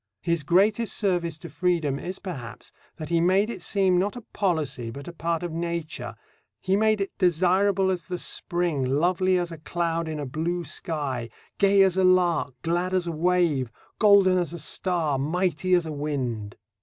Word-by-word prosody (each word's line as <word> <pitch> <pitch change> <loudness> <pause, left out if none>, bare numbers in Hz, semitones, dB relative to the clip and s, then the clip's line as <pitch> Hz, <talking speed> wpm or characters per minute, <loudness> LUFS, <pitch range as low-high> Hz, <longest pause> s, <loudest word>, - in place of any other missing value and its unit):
His 170 -2 +1
greatest 200 +9 +2
service 175 -6 0
to - - -9
freedom 155 -3 0
is, 185 +2 -5
perhaps, 135 - -8 0.3
that 155 -3 -7
he 170 -1 +2
made 190 +5 +3
it 190 - -7
seem, 185 -1 +2
not 200 +4 -1
a 245 - -7
policy, 155 - -2
but 140 +4 -9
a 175 - -7
part 170 0 -2
of 175 - -3
Nature. 170 -1 -4 0.4
He 190 +11 +1
made 215 0 +2
it 195 - -3
desirable 190 +2 +3
as 180 -2 -3
the 180 - -4
spring, 175 -5 -2
lovely 175 +7 +2
as 175 -1 -2
a 165 - -8
cloud 165 0 -2
in 155 -1 -4
a 145 - -3
blue 165 +6 -2
sky, 140 -6 -3 0.3
gay 200 -1 +5
as 190 -1 +2
a 190 - +3
lark, 175 -7 +3
glad 175 +3 0
as 180 -2 +1
a 170 - -2
wave, 165 -6 +1 0.3
golden 200 -3 +5
as 175 -1 -2
a - - -5
star, 160 -2 -1
mighty 180 +4 +1
as 175 -2 +1
a 160 - -4
wind. 130 -8 -3
175 Hz, 180 wpm, -25 LUFS, 155-185 Hz, 0.4 s, gay